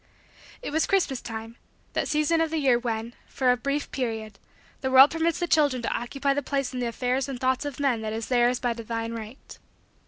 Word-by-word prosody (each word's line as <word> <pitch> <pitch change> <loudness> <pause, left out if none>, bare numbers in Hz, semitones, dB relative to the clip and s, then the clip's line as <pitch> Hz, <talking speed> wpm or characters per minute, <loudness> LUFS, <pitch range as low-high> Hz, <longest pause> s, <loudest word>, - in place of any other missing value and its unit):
It - - -4
was 315 +2 +1
Christmas 350 -10 +1
time; 225 0 -7 0.4
that - - 0
season 305 +2 +2
of 325 - +1
the 320 - -2
year 265 -5 +3
when, 230 -1 -3
for 255 -2 +2
a - - +3
brief 280 +4 -2
period, 220 -5 -4 0.4
the 265 - -1
world 265 +2 +8
permits 330 +1 0
the 350 - 0
children 290 -7 +2
to - - -1
occupy 275 +4 -1
the 285 - -1
place 275 -1 -2
in 250 - -3
the 245 - -1
affairs 250 +3 -1
and 260 -3 -5
thoughts 260 +2 +1
of 290 -1 -5
men 265 -6 +1
that 215 -1 -3
is 220 0 -3
theirs 245 0 +3
by 245 -1 0
divine 230 0 -4
right. 225 +3 -9
255 Hz, 215 wpm, -26 LUFS, 230-285 Hz, 0.4 s, world